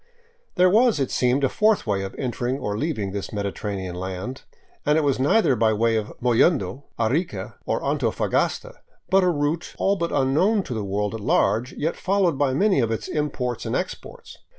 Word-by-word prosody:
There 180 -1 +5
was, 220 - +4
it 135 - -1
seemed, 125 +3 +1
a - - +5
fourth 215 +4 +2
way 100 -3 0
of 95 0 -6
entering 125 0 -2
or 105 -6 -3
leaving 110 -7 -2
this 100 0 -5
mediterranean 100 -2 -4
land, 95 +8 -5 0.4
and 150 +1 +3
it 160 - +2
was 140 -3 +1
neither 140 - +3
by 110 -1 +2
way 115 +1 +2
of 110 -1 -2
Mollendo, 130 +3 +2
Arica, 115 - -1
nor - - -1
Antofagasta; - - -1 0.3
but 190 0 +5
a 180 - +3
route 155 +1 -1
all 200 +1 +1
but 170 -2 -2
unknown 180 +11 +2
to 125 - -5
the 110 -2 -3
world 100 +1 -2
at 115 - -5
large, 110 +4 +1
yet 160 +3 -2
followed 190 -4 +1
by 140 -2 +2
many 190 +5 +2
of 115 -3 +1
its 115 - -3
imports 135 -5 -2
and - - -2
exports. - - -6
130 Hz, 185 wpm, -23 LUFS, 105-165 Hz, 0.4 s, There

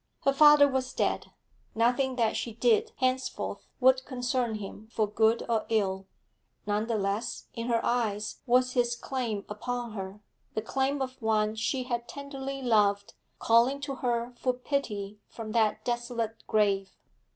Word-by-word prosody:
Her 275 - +3
father 295 0 +8
was 265 -1 -2
dead; - - 0 0.5
nothing 250 +3 +2
that 230 -3 +1
she 230 - -3
did 445 - +3
henceforth 260 0 -2
would 260 0 +5
concern 245 -3 -1
him 210 +1 -8
for 220 -2 +1
good 220 +2 +2
or 225 -2 0
ill; 195 -3 0 0.6
none 210 +1 0
the 230 -2 0
less 200 +2 -2
in 230 0 -4
her 230 -1 +1
eyes 215 -3 -1
was 255 +1 +4
his 240 -1 +2
claim 235 -5 -3
upon 240 +3 -4
her, 195 0 -6 0.4
the 215 - 0
claim 270 +3 0
of 260 0 -7
one 215 -1 +2
she 240 +4 -1
had 240 -2 -3
tenderly 275 -1 -6
loved 205 -4 +2 0.2
calling 235 +5 +3
to 280 -1 -3
her 240 -1 -1
for 255 - +1
pity 210 -6 -3
from 220 -2 -7
that 220 -2 +1
desolate 240 -2 -3
grave. 200 -2 +1
235 Hz, 150 wpm, -29 LUFS, 215-260 Hz, 0.6 s, father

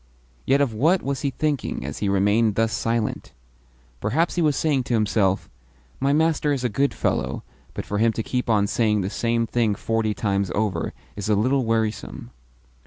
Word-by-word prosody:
Yet 140 +2 +4
of 135 -5 +1
what 160 - +2
was 140 -1 -2
he 140 - 0
thinking 140 - -2
as 70 - -5
he 100 - 0
remained 105 +2 +2
thus 115 0 +1
silent? 115 -1 -2 0.7
Perhaps 155 - +1
he 175 - 0
was 150 -3 +2
saying 145 -4 +1
to 120 - 0
himself: 105 -3 +1 0.5
"My 135 +1 +2
master 155 0 +2
is 135 -3 -1
a 125 - +1
good 140 +6 +1
fellow, - - -1 0.3
but - - -4
for 105 - -2
him 115 +1 +4
to 115 - -3
keep 125 +1 -2
on 105 -3 +3
saying 105 0 +1
the 95 +1 -3
same 115 0 0
thing 115 -3 +1
forty 110 0 -1
times 100 -3 -1
over 105 -2 -1 0.2
is 100 +1 -4
a 105 - +4
little 130 +5 +2
wearisome." 110 - -2
115 Hz, 185 wpm, -23 LUFS, 105-135 Hz, 0.7 s, Yet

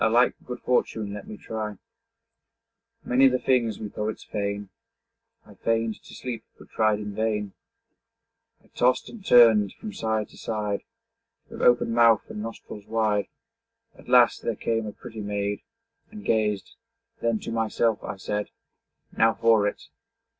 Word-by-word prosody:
'A 110 - +5
like 120 +2 +4
good 125 -1 -5
fortune 110 -4 0
let 105 - -8
me 105 - -8
try.' 105 -2 -5 1.3
Many 130 +2 +5
the 130 -1 +3
things 125 -4 +1
we 110 - -5
poets 105 +1 -4
feign. 100 -1 -3 0.8
I - - -15
feign'd 115 -1 -1
to - - -13
sleep, 125 -3 -5
but - - -16
tried 110 -1 +2
in 105 -1 -6
vain. 105 -2 -1 1.1
I - - -26
tost 125 +1 +1
and 225 -4 -11
turn'd 110 - +6
from 215 -2 -8
side 110 -1 -1
to - - -16
side, 105 -2 -2 0.7
With - - -7
open 120 -1 +4
mouth 115 -2 +5
and 105 - -5
nostrils 110 -2 -8
wide. 110 -2 +1 0.7
At - - -16
last - - +5
there - - -2
came 115 -1 -1
a - - -4
pretty 110 0 -9
maid, 100 0 -2 0.5
And 210 -1 -11
gazed; 105 -3 0 0.5
then 115 -1 +1
to - - -5
myself 115 -1 0
I - - -4
said, 105 +2 -3 0.7
'Now 115 0 +4
for 115 -3 +4
it!' - - -4
110 Hz, 155 wpm, -26 LUFS, 105-115 Hz, 1.3 s, turn'd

